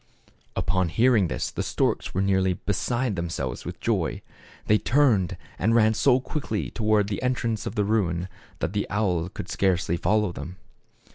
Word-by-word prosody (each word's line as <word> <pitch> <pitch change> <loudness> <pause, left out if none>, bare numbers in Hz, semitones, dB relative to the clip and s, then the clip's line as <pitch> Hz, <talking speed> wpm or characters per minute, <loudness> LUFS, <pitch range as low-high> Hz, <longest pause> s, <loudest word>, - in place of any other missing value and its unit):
Upon 95 -2 +1
hearing 115 -1 +3
this - - -3
the - - -3
storks - - 0
were 95 - 0
nearly 95 -1 +2
be 100 - -2
side 120 +2 -1
themselves 80 -8 -4
with - - -6
joy. - - -1 0.4
They 105 0 +4
turned, 120 -10 +2 0.2
and 110 +5 +2
ran 110 -1 +5
so 125 +3 +4
quickly 130 -6 -3
toward 110 -2 +2
the 100 -2 -3
entrance 115 -4 -1
of - - -5
the 105 - +1
ruin, 90 -5 0 0.3
that 90 - -1
the 105 - -1
owl 90 -5 0
could - - -7
scarcely 90 -3 +1
follow 105 +2 +1
them. 85 +1 -7
105 Hz, 165 wpm, -25 LUFS, 90-110 Hz, 0.4 s, ran